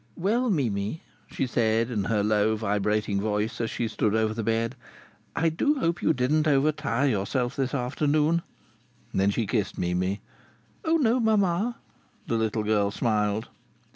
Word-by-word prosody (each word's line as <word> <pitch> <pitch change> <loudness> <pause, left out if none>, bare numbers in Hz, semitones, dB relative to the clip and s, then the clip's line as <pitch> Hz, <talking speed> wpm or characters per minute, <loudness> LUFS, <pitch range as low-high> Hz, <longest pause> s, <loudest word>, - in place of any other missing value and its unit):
"Well, 230 +8 +1
Mimi," 120 - -1 0.2
she - - -2
said 115 -1 +1
in 105 -4 -1
her 105 -2 +1
low, 105 +1 +2
vibrating 105 -1 0
voice, 105 +2 -1
as 115 - -1
she 120 - -2
stood 110 -1 0
over 110 -1 +1
the 115 - -3
bed, 115 +2 0 0.6
"I 165 - +2
do 290 - +1
hope 170 -8 0
you - - +3
didn't 150 +3 +1
overtire 140 -2 +2
yourself 120 +3 -1
this 135 0 -1
afternoon." 150 +5 +1 0.7
Then 95 +1 +2
she 110 +3 0
kissed 105 -1 -1
Mimi. 90 +3 -1 0.6
"Oh 325 0 +3
no, 250 -4 +2
mamma!" 215 0 +1 0.5
The - - -3
little 110 -1 0
girl 105 -1 +2
smiled. 105 0 0
115 Hz, 150 wpm, -26 LUFS, 105-155 Hz, 0.7 s, you